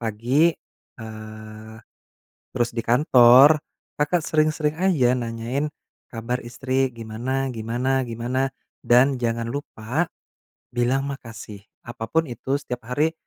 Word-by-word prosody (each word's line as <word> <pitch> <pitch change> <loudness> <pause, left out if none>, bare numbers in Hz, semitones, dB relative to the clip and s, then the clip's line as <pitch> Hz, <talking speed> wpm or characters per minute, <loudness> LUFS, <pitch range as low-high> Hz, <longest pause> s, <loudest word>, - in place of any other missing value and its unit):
pagi, 120 +9 +2 0.5
eee, 110 0 -10 0.8
terus 120 -2 0
di 115 - -2
kantor 130 +3 +6 0.4
Kakak 155 +2 +1
sering-sering 155 -1 +1
aja 150 -10 +3
nanyain 120 +4 -2 0.4
kabar 120 +2 -3
istri, 130 +2 -1
gimana 120 +4 -3
gimana 120 +4 -1
gimana, 125 +3 -2 0.3
dan 125 +2 +4
jangan 115 0 -1
lupa 135 +3 -3 0.7
bilang 125 +3 +1
makasih, 115 -6 -8 0.2
apapun 120 +7 -1
itu 130 +2 -2
setiap 125 -4 -6
hari, 150 +6 +1
125 Hz, 105 wpm, -23 LUFS, 115-140 Hz, 0.8 s, kantor